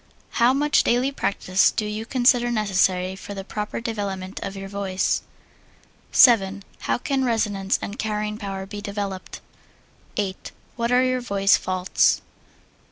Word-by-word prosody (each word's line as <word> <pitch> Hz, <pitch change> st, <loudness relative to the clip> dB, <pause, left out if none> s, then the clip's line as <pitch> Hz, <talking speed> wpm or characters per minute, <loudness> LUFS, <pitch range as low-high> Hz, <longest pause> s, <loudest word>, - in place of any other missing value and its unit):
How 235 Hz, +1 st, +4 dB
much 290 Hz, +2 st, +3 dB
daily 250 Hz, +3 st, +1 dB
practise 190 Hz, -7 st, +2 dB
do 215 Hz, -, -2 dB
you 215 Hz, +1 st, -4 dB
consider 245 Hz, -1 st, +3 dB
necessary 190 Hz, -4 st, +1 dB
for 200 Hz, +1 st, -8 dB
the 195 Hz, -, -5 dB
proper 210 Hz, +1 st, -4 dB
development 200 Hz, -5 st, -4 dB
of 195 Hz, -, -5 dB
your 195 Hz, 0 st, -6 dB
voice? 195 Hz, -1 st, -1 dB, 0.9 s
7. 200 Hz, -5 st, +5 dB, 0.2 s
How -, -, 0 dB
can 270 Hz, +2 st, -1 dB
resonance 205 Hz, -5 st, 0 dB
and 205 Hz, -, -6 dB
carrying 210 Hz, 0 st, -2 dB
power 195 Hz, -2 st, -5 dB
be 205 Hz, +1 st, -7 dB
developed? 200 Hz, -2 st, -5 dB, 0.8 s
8. 195 Hz, -3 st, -3 dB, 0.2 s
What 235 Hz, 0 st, -1 dB
are 250 Hz, +1 st, +4 dB
your 255 Hz, 0 st, 0 dB
voice 200 Hz, -4 st, +3 dB
faults? 185 Hz, 0 st, +1 dB
9. -, -, -34 dB
205 Hz, 145 wpm, -23 LUFS, 195-235 Hz, 0.9 s, 7